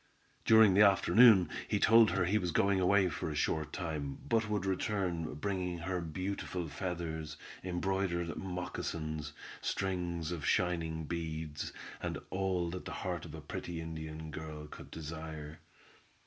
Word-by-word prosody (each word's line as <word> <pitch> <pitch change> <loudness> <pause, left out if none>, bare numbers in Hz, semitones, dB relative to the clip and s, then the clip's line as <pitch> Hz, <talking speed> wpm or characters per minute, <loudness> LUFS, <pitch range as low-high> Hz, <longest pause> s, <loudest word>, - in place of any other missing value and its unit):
During 110 -3 +7
the 100 - +6
afternoon 100 -1 +7 0.2
he - - +1
told 115 -1 +7
her 90 0 +1
he 105 +5 +2
was 90 -3 -1
going 100 +3 +3
away 95 +1 +4
for 80 -1 -3
a 75 - -4
short 75 0 0
time, 75 -5 -3
but 115 -2 +2
would 105 -2 0
return 95 -4 -1
bringing 90 +1 -2
her 90 +2 -2
beautiful 90 +1 -3
feathers, 80 -4 -4 0.3
embroidered 90 -2 -1
moccasins, 80 -4 -4 0.3
strings 85 -4 -2
of 85 -4 -4
shining 85 -3 +1
beads, 80 -2 -4 0.3
and - - -2
all 95 -3 0
that 90 - -6
the - - -5
heart 90 -2 -2
of 80 -1 -8
a 80 - -8
pretty 85 +3 -5
Indian 80 -1 -6
girl 75 -1 -6
could 75 - -11
desire. 80 -1 -7
85 Hz, 145 wpm, -33 LUFS, 80-95 Hz, 0.3 s, During